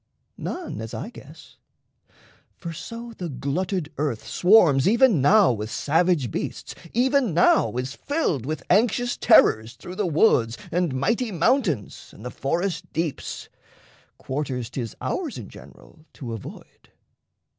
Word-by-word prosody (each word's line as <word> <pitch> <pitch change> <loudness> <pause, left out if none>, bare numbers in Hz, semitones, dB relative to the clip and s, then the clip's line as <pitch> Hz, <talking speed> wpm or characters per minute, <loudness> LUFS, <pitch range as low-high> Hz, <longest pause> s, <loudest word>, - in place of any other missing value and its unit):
None, 350 - -5
as 115 - -6
I - - -6
guess. - - -14 1.0
For 170 - -6
so 230 +7 -8
the 175 -4 -5
glutted 155 +5 -3
earth 140 -7 -2
Swarms 175 -9 +5
even 230 - +4
now 195 +4 +5
with 110 -2 -4
savage 155 - +1
beasts, - - -5 0.2
even 255 - +2
now 115 -9 +4
Is 130 +2 -3
filled 285 - -1
with 155 +4 -4
anxious 240 +4 +2
terrors 110 +2 +4
through 180 - -10
the 205 - 0
woods 125 - +3
And 175 -6 0
mighty 230 - 0
mountains 175 - 0
and 110 - -12
the 125 - -5
forest 175 +7 -2
deeps 160 -2 -4 0.7
Quarters 130 -3 -4
'tis 120 -5 -5
ours - - -3
in - - -8
general 155 - -16
to 120 -4 -7
avoid. 110 - -11
165 Hz, 135 wpm, -24 LUFS, 130-210 Hz, 1.0 s, Swarms